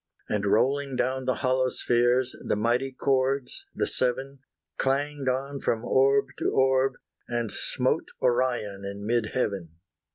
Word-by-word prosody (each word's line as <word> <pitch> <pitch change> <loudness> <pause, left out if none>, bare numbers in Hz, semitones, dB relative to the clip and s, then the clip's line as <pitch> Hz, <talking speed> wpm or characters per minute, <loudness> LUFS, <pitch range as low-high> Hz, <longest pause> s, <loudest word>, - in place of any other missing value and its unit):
And 105 -1 -1
rolling 135 +6 +2
down 130 +1 -1
the 130 - +1
hollow 130 0 +2
spheres, 120 +1 +1
The - - 0
mighty 120 +5 +1
chords, 135 0 0
the - - +1
seven, 130 +2 0 0.4
Clanged 140 0 0
on 135 +2 -2
from 115 -2 -1
orb 135 +1 +3
to - - +1
orb, 130 0 +3 0.3
and 120 -3 -2
smote - - -1
Orion 120 -5 0
in 100 +1 -6
mid 115 0 +1
heaven. 95 -9 -2
130 Hz, 135 wpm, -27 LUFS, 120-135 Hz, 0.4 s, orb